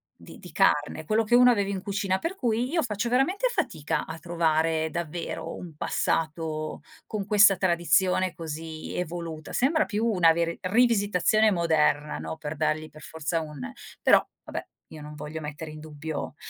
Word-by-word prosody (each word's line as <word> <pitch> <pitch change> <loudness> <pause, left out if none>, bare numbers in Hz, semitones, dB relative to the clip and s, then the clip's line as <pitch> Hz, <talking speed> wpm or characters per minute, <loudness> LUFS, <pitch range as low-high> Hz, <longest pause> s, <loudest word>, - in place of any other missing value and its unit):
di - - -14
di - - -12
carne, 150 +2 +2
quello 220 +4 +2
che 240 - +3
uno 250 0 +7
aveva 200 -4 +1
in 195 -2 -3
cucina, 195 -2 0
per 330 - -3
cui 245 - 0
io 330 -1 +2
faccio 225 +1 -2
veramente 360 - +2
fatica 160 - -2
a 160 0 -6
trovare 160 -1 +1
davvero 170 0 -4
un 170 -4 -9
passato 155 0 -2 0.2
con 210 -2 -4
questa 205 -2 +6
tradizione 185 +1 +2
così 160 0 -6
evoluta. 165 -2 -5
Sembra 310 +5 +3
più 215 +2 -1
una 180 -7 +5
veri 170 0 -1
rivisitazione 215 -1 +3
moderna, 155 -4 +1
no, 80 0 -5
per 150 +1 -5
dargli 155 +2 -1
per 155 +1 -15
forza 160 +1 -3
un 150 -5 -7 0.3
però, - - +5 0.2
vabbè, - - -5 0.2
io 155 - -11
non 150 0 -9
voglio 150 +1 -6
mettere 150 +1 -6
in 155 - -9
dubbio 155 0 -6
170 Hz, 165 wpm, -26 LUFS, 155-210 Hz, 0.3 s, uno